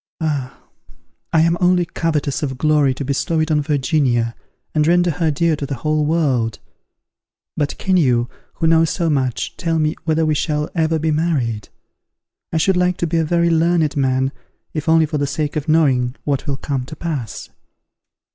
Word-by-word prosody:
_ - - -84 0.2
Ah! 145 -6 -2 0.7
I 160 - +4
am 165 +1 +3
only 180 -1 +3
covetous 155 -5 -1
of 135 -4 -3
glory 150 -2 +2
to 140 - -5
bestow 140 +4 0
it 155 +1 0
on 150 -1 +3
Virginia, 135 -5 +1 0.4
and 150 -1 +2
render 175 +1 +3
her 165 0 0
dear 160 +2 +1
to 145 -1 -5
the 140 - -3
whole 150 +4 0
world. 130 -9 +1 1.0
But 145 -1 -2
can 190 -1 +1
you, 125 -7 +2 0.3
who - - -2
know 165 0 +5
so 165 +1 0
much, 130 -4 -1
tell 165 -1 -1
me 155 0 +1
whether 160 0 +1
we 155 - +2
shall 150 0 -1
ever 160 -1 +1
be 160 0 0
married? 145 -9 -1 0.8
I - - 0
should 180 +3 +2
like 180 0 +1
to - - -1
be 165 0 -1
a 165 - +2
very 170 +1 +2
learned 165 -2 +2
man, 130 -1 +1 0.4
if 155 0 -3
only 160 0 +5
for 150 -1 -3
the 145 - 0
sake 145 +1 -2
of 155 0 -3
knowing 130 -6 +2
what 140 0 -2
will 140 -2 -1
come 135 -2 -3
to 155 - -9
pass. 150 -8 -5
155 Hz, 185 wpm, -19 LUFS, 140-165 Hz, 1.0 s, know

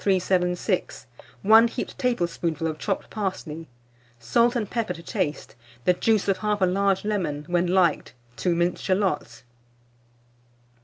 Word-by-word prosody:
376; 180 -2 0 0.4
1 220 +3 +7
heaped - - -5
tablespoonful 170 - -1
of 155 -1 -3
chopped 195 -3 -3
parsley, 170 -6 -4 0.5
salt 235 - +2
and 225 -4 -1
pepper 220 -6 -2
to 165 - -11
taste, 150 -2 -3 0.3
the 180 - +5
juice 215 +3 +1
of 195 -1 +1
1/2 205 -4 +1
large 195 0 +1
lemon; 170 -9 -2
when 175 0 +1
liked, 175 -3 +2 0.2
2 175 +4 0
minced 175 +1 0
shalots. 190 -4 -1
185 Hz, 125 wpm, -25 LUFS, 170-210 Hz, 0.5 s, 1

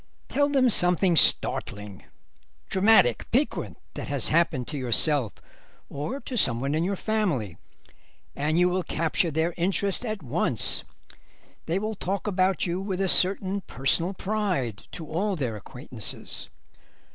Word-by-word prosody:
Tell 285 +2 +1
them 270 -3 +3
something 180 -1 +3
startling, 105 -8 +3 0.6
dramatic, 190 - +3
piquant 270 +5 -1 0.2
that - - -6
has - - 0
happened 155 -6 +1
to 150 - -5
yourself 130 -1 +2 0.6
or 150 - -4
to 255 - -7
someone 135 - +3
in 160 +2 0
your 195 +3 -1
family, 180 - -2 0.8
and 150 +3 -1
you 180 +1 +4
will 180 +1 0
capture 165 +1 0
their 160 +3 -1
interest 195 +4 -1
at 215 -6 -4
once. 125 - +1 0.8
They 165 +3 0
will 215 +2 -3
talk 200 -1 -4
about 190 -2 +1
you 175 +1 -2
with 195 -2 -4
a 195 - +1
certain 195 +2 +2
personal 165 +8 0
pride 185 - -2
to 165 - -7
all 185 +6 -2
their 125 -9 -3
acquaintances. 105 - -6
180 Hz, 135 wpm, -25 LUFS, 145-200 Hz, 0.8 s, you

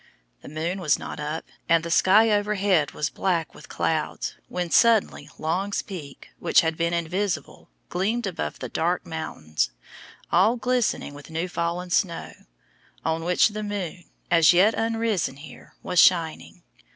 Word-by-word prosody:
The - - -11
moon 165 +5 -3
was 150 -5 +2
not - - -7
up, 150 +2 -4 0.2
and 165 0 +4
the 170 - -4
sky 215 +6 +5
overhead 205 -6 +2
was 150 - -3
black 170 -5 -1
with - - -14
clouds, - - -2
when 175 -2 -3
suddenly 220 -10 +3
Long's 185 +6 -1
Peak, 155 -9 -9
which - - +4
had 160 -1 -1
been 170 +1 0
invisible, 170 - -3 0.2
gleamed 215 +6 -1
above 185 -4 -4
the - - -5
dark 175 +2 -1
mountains, 80 - -3 0.6
all 195 +7 +4
glistening 245 - -1
with 145 +1 -12
new 165 +3 -2
fallen 175 +1 -3
snow, 170 -3 0 0.7
on 160 0 0
which 180 +5 +3
the 215 0 -5
moon, 190 -4 -5 0.3
as 165 -1 +6
yet 195 +6 +5
uprisen 225 -9 -1
here, 140 -1 -13
was 180 -1 +1
shining. 165 -3 +2
175 Hz, 150 wpm, -25 LUFS, 160-205 Hz, 0.7 s, as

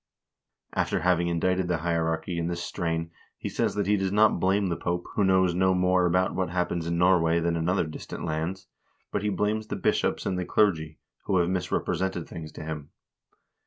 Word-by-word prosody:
After - - 0
having 90 -1 +2
indicted 90 +2 +1
the 85 -1 +1
hierarchy 85 +1 -1
in 85 - -1
this 85 0 -3
strain 80 -2 -2 0.3
he - - -5
says - - -1
that 100 -1 0
he 105 +2 +3
does 95 -1 -1
not 105 -2 +4
blame 95 +2 +2
the 85 - 0
Pope, 85 +1 -2
who 105 - +1
knows 95 -2 +4
no 95 +1 +3
more 90 0 +3
about 90 +2 +2
what 95 -3 -1
happens 90 -1 -1
in 85 0 0
Norway 85 -2 +4
than 85 0 0
in 85 +1 0
other 95 -1 +2
distant 80 - -7
lands, 80 +5 -3 0.5
but 100 - -1
he 105 - 0
blames 105 +3 -1
the - - -3
bishops - - 0
and 90 -1 -1
the - - -1
clergy, 80 -8 +1 0.3
who 95 - +2
have 85 -1 +2
misrepresented 90 -1 -1
things 80 -2 -8
to - - -8
him. 75 -2 -6
90 Hz, 200 wpm, -27 LUFS, 85-95 Hz, 0.5 s, not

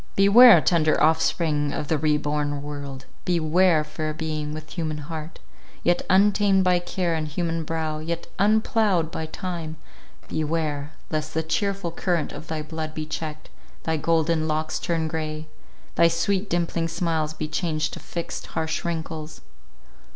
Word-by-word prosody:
Beware, 220 +5 +8
tender 160 -4 +3
offspring 155 -1 +2
of 150 - -3
the 160 - +1
re 150 0 +3
born 145 -1 -2
world— 140 -2 -6 0.2
beware, 170 -1 +3
fair 155 0 -4
being, 155 -2 -3
with 155 0 -8
human 155 -3 -3
heart, 155 +2 -7 0.5
yet 175 0 +3
untamed 195 0 +4
by 180 -1 +3
care, 175 -1 -1
and 155 -1 -1
human 165 +1 -2
brow, 160 -1 -2
yet 165 +2 -4
unploughed 205 -4 +2
by 160 -1 -4
time—beware, 155 -3 -4 0.2
lest 155 0 -2
the 160 - +1
cheerful 195 +2 -1
current 170 -1 -1
of 160 - -9
thy 155 -1 -3
blood 155 0 -5
be 155 - -3
checked, 155 0 -6 0.3
thy 160 - 0
golden 160 0 +1
locks 155 0 -1
turn 165 -2 -1
grey, 155 -1 -4 0.5
thy 170 - +5
sweet 185 +5 0
dimpling 170 -1 0
smiles 165 -2 -1
be 155 - -3
changed 155 -1 -1
to - - -6
fixed, 170 -1 -5
harsh 160 0 -1
wrinkles! 160 -2 -4
160 Hz, 145 wpm, -24 LUFS, 155-170 Hz, 0.5 s, Beware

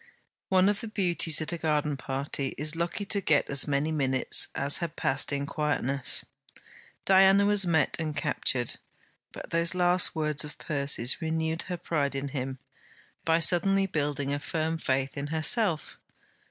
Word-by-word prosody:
One 185 0 +3
of 205 0 0
the 225 - -6
Beauties 175 -6 +3
at 155 - -1
a 170 - -5
garden 150 -2 -1
party 135 +1 -4
is 150 +2 +2
lucky 170 +4 -3
to 200 0 +1
get 155 -5 +1
as 140 -1 +1
many 145 +2 -1
minutes 135 -4 +2
as 140 +1 +4
had 170 -3 -5
passed 135 +2 +2
in 140 0 -2
quietness. 140 -3 0 0.8
Diana 195 +1 +5
was 205 -2 +2
met 160 -3 +1
and 155 -2 -4
captured. 130 -5 0 0.5
But - - -10
those 170 +2 0
last 180 0 +2
words 150 -2 0
of 150 +1 -10
Percy's 140 -4 0
renewed 160 0 -2
her 180 - -3
pride 145 -5 -2
in 140 +1 -4
him 135 -1 -5 0.7
by 165 0 +2
suddenly 195 +3 +2
building 145 -5 -3
a 145 - -2
firm 160 +2 -3
faith 135 -2 -2
in 140 +1 -4
herself. 160 +3 0
155 Hz, 160 wpm, -27 LUFS, 140-175 Hz, 0.8 s, Diana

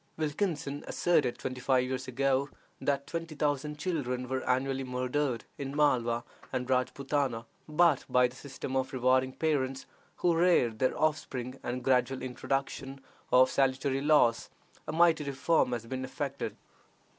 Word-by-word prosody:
Wilkinson 150 -2 -2
asserted 150 -8 +1
twenty 130 -1 -5
five 130 -1 +3
years 130 0 -3
ago 135 +2 +1 0.3
that 140 -1 0
twenty 165 0 -5
thousand 150 0 -1
children 130 -7 -2
were 130 +1 -2
annually 135 +1 +1
murdered 125 0 -1
in 140 0 -4
Malwa 120 -5 +2 0.3
and 125 0 -2
Rajpootana, 130 -1 0 0.2
but 155 -2 +3
by 125 0 +4
the 125 - -14
system 135 -1 -6
of 130 0 -1
rewarding 130 +1 +2
parents 135 -3 -1 0.3
who 175 -1 +2
reared 165 -11 +3
their 130 - +1
offspring, 135 -4 -1
and 125 +1 -3
the - - -13
gradual 130 0 +2
introduction 135 +1 -3 0.3
of 130 0 +6
salutary 135 0 +1
laws, 145 -6 +3 0.4
a - - -2
mighty 165 -2 +4
reform 140 +1 +1
has 120 -2 -3
been 130 +2 -4
effected. 140 +1 -4
135 Hz, 145 wpm, -30 LUFS, 125-145 Hz, 0.4 s, of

